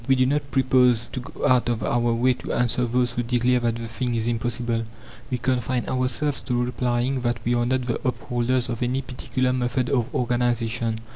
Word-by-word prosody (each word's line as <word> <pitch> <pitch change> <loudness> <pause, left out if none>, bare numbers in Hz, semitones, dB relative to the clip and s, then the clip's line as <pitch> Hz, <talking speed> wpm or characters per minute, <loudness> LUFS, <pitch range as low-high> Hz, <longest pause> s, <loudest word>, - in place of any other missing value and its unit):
We 135 - +5
do 130 0 +3
not 145 +1 0
propose 125 -3 +3
to 130 - -4
go 125 - -3
out 125 -2 +3
of 120 -1 -1
our 120 0 +1
way 125 +3 +3
to - - -6
answer 120 +1 +1
those 120 0 +1
who 120 - -2
declare 125 +1 +2
that 120 -1 0
the 115 0 -5
thing 120 +2 -2
is 115 -1 -1
impossible. 120 0 -1 0.4
We 125 - -1
confine 125 0 -1
ourselves 130 +3 0
to 125 -1 0
replying 125 +1 0
that 120 -1 -1
we 120 - +2
are 120 0 +1
not 130 0 0
the 120 - -2
upholders 125 -1 0
of 120 -1 -4
any 130 +2 0
particular 130 0 -1
method 125 0 0
of 125 0 +1
organization. 120 -2 0
125 Hz, 200 wpm, -24 LUFS, 120-130 Hz, 0.4 s, We